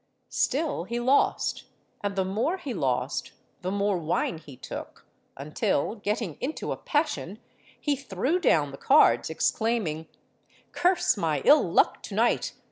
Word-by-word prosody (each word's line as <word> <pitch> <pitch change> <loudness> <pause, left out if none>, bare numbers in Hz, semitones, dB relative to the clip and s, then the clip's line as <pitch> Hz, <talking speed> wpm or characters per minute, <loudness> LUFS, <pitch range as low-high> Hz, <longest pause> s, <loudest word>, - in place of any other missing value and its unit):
Still 285 - 0
he 235 +4 -3
lost—and 240 -5 -1
the 190 -1 +1
more 225 - -1
he 280 -8 -5
lost, 135 - -1 0.3
the 180 - -2
more 200 -1 0
wine 165 0 -1
he 145 -5 -13
took; - - -8 0.3
until, 140 +4 -1
getting 210 -5 -3
into 295 +5 -3
a - - -1
passion, 290 - -2 0.4
he 290 -1 0
threw 270 - -1
down 150 - +2
the 135 - -10
cards, 290 +3 +4
exclaiming, 205 -9 -1 0.6
'Curse 350 - +2
my 155 -6 -1
ill 300 - +7
luck - - +2
to - - -7
night! - - +1
205 Hz, 135 wpm, -27 LUFS, 165-270 Hz, 0.6 s, ill